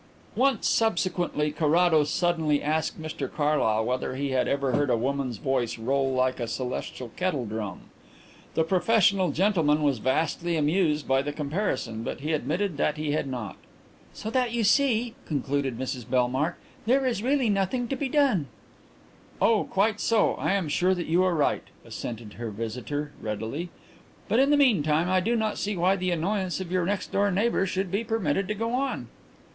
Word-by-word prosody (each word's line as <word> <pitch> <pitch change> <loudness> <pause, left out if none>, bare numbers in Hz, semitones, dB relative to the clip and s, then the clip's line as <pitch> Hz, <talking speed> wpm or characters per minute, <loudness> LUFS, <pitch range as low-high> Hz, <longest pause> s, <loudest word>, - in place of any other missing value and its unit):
Once, 265 -4 +2
subsequently, 175 -8 +1
Carrados 155 0 +3
suddenly 160 -4 +1
asked 155 +2 -1
Mr 155 -1 -5
Carlyle 145 -8 +1
whether 125 +1 -2
he 140 +1 -2
had 130 -1 +1
ever 140 -1 0
heard 145 +2 +1
a 120 - +3
woman's 130 -1 -2
voice 120 -1 -1
roll 135 +4 0
like 130 0 +1
a 120 - -2
celestial 125 0 -4
kettle 180 -9 -1
drum. 105 -2 -5 0.7
The 160 - +3
professional 190 +1 +3
gentleman 160 -5 +2
was 140 -5 +2
vastly 160 +7 0
amused 155 0 +1
by 135 0 +3
the 145 +2 -3
comparison, 145 - -2
but 115 - -5
he 155 +3 -1
admitted 155 +5 -1
that 150 +2 0
he 150 -1 -2
had 145 -1 -1
not. 120 -7 -5 0.5
"So 220 - -6
that, 250 -1 +1
you 235 -1 +1
see," 235 +1 +3
concluded 140 -3 -1
Mrs 125 -2 -5
Bellmark, 130 +4 +1 0.3
"there 265 +3 +3
is 240 -5 0
really 260 -2 +2
nothing 205 +5 0
to 270 - -1
be 270 0 -2
done." 255 - +2 0.9
"Oh, 225 -2 +3
quite 205 +2 +1
so; 225 -3 +2
I - - -1
am 195 -5 0
sure 180 +5 +2
that 175 - -3
you 170 +3 +2
are 185 -2 +2
right," 150 - +1 0.2
assented 115 -3 -7
her 120 -1 -3
visitor 125 +7 -4
readily. 110 +11 -4 0.6
"But 230 - +2
in 275 +1 +4
the 295 - +5
meanwhile 170 - +3
I 185 - +4
do 230 +6 0
not 220 -2 -1
see 205 -1 -2
why 185 +3 +3
the 185 -1 -2
annoyance 185 +2 -1
of 185 -2 -6
your 180 -2 +1
next 200 0 -2
door 200 +1 +2
neighbour 200 +1 +1
should 185 0 -2
be 200 +4 0
permitted 195 -5 0
to 210 - -2
go 225 +3 -2
on." 270 +2 -1
160 Hz, 175 wpm, -26 LUFS, 135-200 Hz, 0.9 s, the